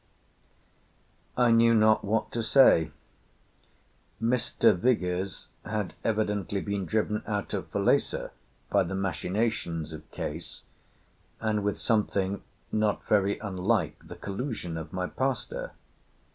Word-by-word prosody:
"I 125 Hz, -1 st, +5 dB
knew 115 Hz, 0 st, +6 dB
not 110 Hz, 0 st, +4 dB
what 110 Hz, +2 st, 0 dB
to 115 Hz, -, -1 dB
say. 110 Hz, -, +5 dB, 1.3 s
Mr. 115 Hz, -2 st, +3 dB
Vigours 95 Hz, -3 st, 0 dB
had 105 Hz, -3 st, -3 dB
evidently 105 Hz, -3 st, 0 dB
been 100 Hz, -1 st, -2 dB
driven 105 Hz, +2 st, 0 dB
out 105 Hz, -2 st, -2 dB
of -, -, -3 dB
Falesá -, -, +1 dB, 0.4 s
by -, -, +4 dB
the 95 Hz, -, -2 dB
machinations 95 Hz, -4 st, -1 dB
of 80 Hz, -, -10 dB
Case 80 Hz, +3 st, -6 dB, 0.8 s
and 110 Hz, -2 st, 0 dB
with 105 Hz, 0 st, -1 dB
something 100 Hz, -3 st, +1 dB, 0.3 s
not 105 Hz, -1 st, 0 dB
very 100 Hz, -1 st, +2 dB
unlike 100 Hz, +1 st, -1 dB
the -, -, -8 dB
collusion 100 Hz, -, -4 dB
of 80 Hz, -1 st, -6 dB
my 90 Hz, 0 st, -2 dB
pastor. 135 Hz, -, -2 dB
105 Hz, 115 wpm, -28 LUFS, 95-115 Hz, 1.3 s, knew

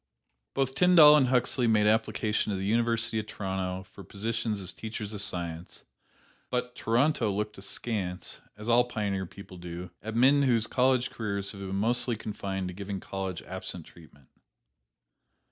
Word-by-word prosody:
Both 135 Hz, -1 st, 0 dB
Tyndall 160 Hz, -1 st, +8 dB
and 140 Hz, -4 st, +4 dB
Huxley 125 Hz, 0 st, +2 dB
made 105 Hz, -2 st, +4 dB
application 110 Hz, 0 st, +1 dB
to 100 Hz, -, -1 dB
the 95 Hz, -, -3 dB
University 115 Hz, +1 st, +1 dB
of 105 Hz, -, -5 dB
Toronto 95 Hz, -2 st, -3 dB
for 95 Hz, +1 st, -13 dB
positions 110 Hz, +3 st, -2 dB
as 95 Hz, -3 st, -3 dB
teachers 110 Hz, -1 st, -6 dB
of 105 Hz, -, -2 dB
science; 85 Hz, -3 st, -3 dB, 0.6 s
but 125 Hz, 0 st, -2 dB
Toronto 120 Hz, -1 st, +1 dB
looked 105 Hz, +1 st, -3 dB
askance, 95 Hz, -2 st, -4 dB, 0.2 s
as 105 Hz, +1 st, -8 dB
all 120 Hz, +1 st, +5 dB
pioneer 100 Hz, -5 st, -2 dB
people 95 Hz, 0 st, -12 dB
do, 90 Hz, 0 st, -7 dB
at 110 Hz, +1 st, -6 dB
men 135 Hz, +4 st, +5 dB
whose 120 Hz, -5 st, +3 dB
college 130 Hz, +1 st, +2 dB
careers 100 Hz, -3 st, -3 dB
have 100 Hz, -, -10 dB
been 95 Hz, 0 st, -4 dB
mostly 120 Hz, +4 st, +3 dB
confined 100 Hz, -3 st, -4 dB
to -, -, -7 dB
giving 100 Hz, +1 st, -5 dB
college 95 Hz, -3 st, -5 dB
absent 90 Hz, -2 st, -7 dB
treatment. 75 Hz, -5 st, -18 dB
105 Hz, 155 wpm, -29 LUFS, 95-120 Hz, 0.6 s, Tyndall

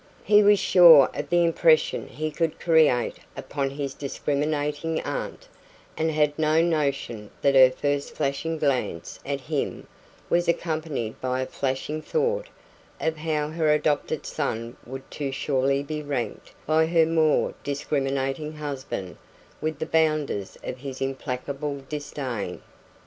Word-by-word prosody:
He 210 Hz, +1 st, +6 dB
was 205 Hz, 0 st, +6 dB
sure 170 Hz, -8 st, +7 dB
of 145 Hz, -, -5 dB
the 175 Hz, 0 st, +4 dB
impression 165 Hz, -1 st, +3 dB
he 155 Hz, 0 st, -4 dB
would 165 Hz, -2 st, 0 dB
create 155 Hz, -7 st, +3 dB, 0.2 s
upon 140 Hz, -2 st, -2 dB
his 140 Hz, 0 st, -4 dB
discriminating 150 Hz, +2 st, -2 dB
aunt, -, -, -5 dB, 0.5 s
and 160 Hz, +1 st, 0 dB
had 150 Hz, -1 st, +1 dB
no 155 Hz, 0 st, +3 dB
notion 140 Hz, -10 st, -1 dB
that 140 Hz, -, +4 dB
her 130 Hz, -1 st, +8 dB
first 145 Hz, +2 st, -2 dB
flashing 150 Hz, +4 st, -1 dB
glance 130 Hz, -, -1 dB
at 140 Hz, -1 st, -2 dB
him 145 Hz, +2 st, -3 dB, 0.4 s
was 175 Hz, +1 st, +1 dB
accompanied 155 Hz, -9 st, -2 dB
by 130 Hz, 0 st, -1 dB
a -, -, -1 dB
flashing 135 Hz, +4 st, -3 dB
thought 475 Hz, -, -1 dB, 0.5 s
of 160 Hz, 0 st, -1 dB
how 150 Hz, -1 st, -1 dB
her 160 Hz, -1 st, +1 dB
adopted 150 Hz, 0 st, 0 dB
son 115 Hz, -5 st, -3 dB
would 135 Hz, +1 st, -8 dB
too 140 Hz, -2 st, -3 dB
surely 135 Hz, 0 st, 0 dB
be 150 Hz, +1 st, -4 dB
ranked 140 Hz, -5 st, -4 dB
by 160 Hz, +1 st, +3 dB
her 165 Hz, -1 st, +4 dB
more 160 Hz, -1 st, +2 dB
discriminating 140 Hz, +1 st, -2 dB
husband 135 Hz, -, -5 dB, 0.4 s
with 155 Hz, -1 st, -2 dB
the 160 Hz, -, -3 dB
"bounders" 155 Hz, -12 st, 0 dB
of 125 Hz, -, -5 dB
his 135 Hz, -1 st, -7 dB
implacable 135 Hz, +1 st, -4 dB
disdain. 130 Hz, -10 st, -5 dB
150 Hz, 135 wpm, -25 LUFS, 135-160 Hz, 0.5 s, her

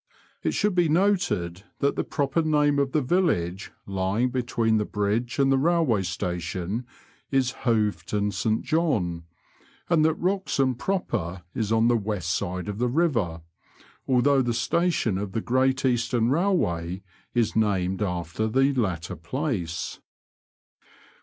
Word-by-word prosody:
It -, -, 0 dB
shoold 210 Hz, -1 st, +1 dB
be 175 Hz, -3 st, +3 dB
noted 160 Hz, -, +1 dB, 0.2 s
that 140 Hz, 0 st, +1 dB
the -, -, 0 dB
proper 145 Hz, +2 st, 0 dB
name 150 Hz, -2 st, +2 dB
of 140 Hz, -1 st, +1 dB
the 150 Hz, 0 st, +1 dB
village 115 Hz, -, 0 dB
lying 100 Hz, +6 st, 0 dB
between 120 Hz, -3 st, +1 dB
the 105 Hz, -, +1 dB
bridge 105 Hz, +4 st, -1 dB
and 135 Hz, -1 st, +3 dB
the 135 Hz, -, +3 dB
railway 160 Hz, -, +2 dB
station 90 Hz, +5 st, -3 dB, 0.4 s
is 130 Hz, -2 st, +2 dB
Hoveton 105 Hz, -3 st, +1 dB
St 110 Hz, +1 st, 0 dB
John, 110 Hz, -, 0 dB, 0.7 s
and 160 Hz, -2 st, +4 dB
that 160 Hz, 0 st, +3 dB
Wroxham 180 Hz, -8 st, +1 dB
proper 115 Hz, -, -2 dB
is 110 Hz, -2 st, -2 dB
on 115 Hz, +1 st, +4 dB
the 120 Hz, -, +4 dB
west 100 Hz, -6 st, -2 dB
side 90 Hz, +1 st, -3 dB
of 105 Hz, +1 st, -4 dB
the 125 Hz, 0 st, +1 dB
river, 120 Hz, -, 0 dB, 0.7 s
although 135 Hz, +2 st, +4 dB
the 120 Hz, -2 st, -1 dB
station 120 Hz, -, +1 dB
of 100 Hz, -2 st, -5 dB
the -, -, 0 dB
Great 130 Hz, +3 st, +1 dB
Eastern 120 Hz, -1 st, +1 dB
Bailway 95 Hz, -, 0 dB, 0.3 s
is 120 Hz, -2 st, +1 dB
named 95 Hz, -3 st, +1 dB
after 90 Hz, +2 st, -2 dB
the 135 Hz, +5 st, +2 dB
latter 95 Hz, -10 st, -2 dB
place. 90 Hz, -, -3 dB
115 Hz, 140 wpm, -25 LUFS, 95-140 Hz, 0.7 s, and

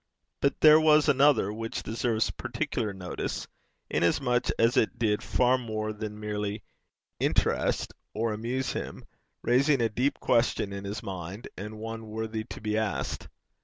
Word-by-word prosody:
But 140 Hz, -, 0 dB
there 155 Hz, 0 st, +9 dB
was 155 Hz, -1 st, +5 dB
another 135 Hz, -7 st, +4 dB
which 115 Hz, +1 st, -4 dB
deserves 115 Hz, 0 st, 0 dB
particular 120 Hz, -3 st, -3 dB
notice, 90 Hz, -2 st, -4 dB, 0.4 s
inasmuch 120 Hz, +8 st, +1 dB
as 115 Hz, +3 st, +3 dB
it 110 Hz, -, +2 dB
did 105 Hz, -3 st, +1 dB
far 125 Hz, +1 st, +2 dB
more 110 Hz, -2 st, -3 dB
than 105 Hz, 0 st, -6 dB
merely 105 Hz, 0 st, -3 dB, 0.6 s
interest -, -, +1 dB, 0.2 s
or 110 Hz, 0 st, -1 dB
amuse 120 Hz, +4 st, -2 dB
him, -, -, -6 dB, 0.4 s
raising 135 Hz, +3 st, +3 dB
a 115 Hz, -1 st, +2 dB
deep 125 Hz, +6 st, 0 dB
question 115 Hz, -4 st, +1 dB
in 100 Hz, 0 st, -6 dB
his 105 Hz, +2 st, -5 dB
mind, 95 Hz, +2 st, -6 dB
and 105 Hz, +3 st, -7 dB
one 115 Hz, 0 st, -6 dB
worthy 110 Hz, 0 st, -3 dB
to -, -, -8 dB
be 105 Hz, 0 st, 0 dB
asked. 110 Hz, -1 st, -2 dB
110 Hz, 145 wpm, -28 LUFS, 105-125 Hz, 0.6 s, there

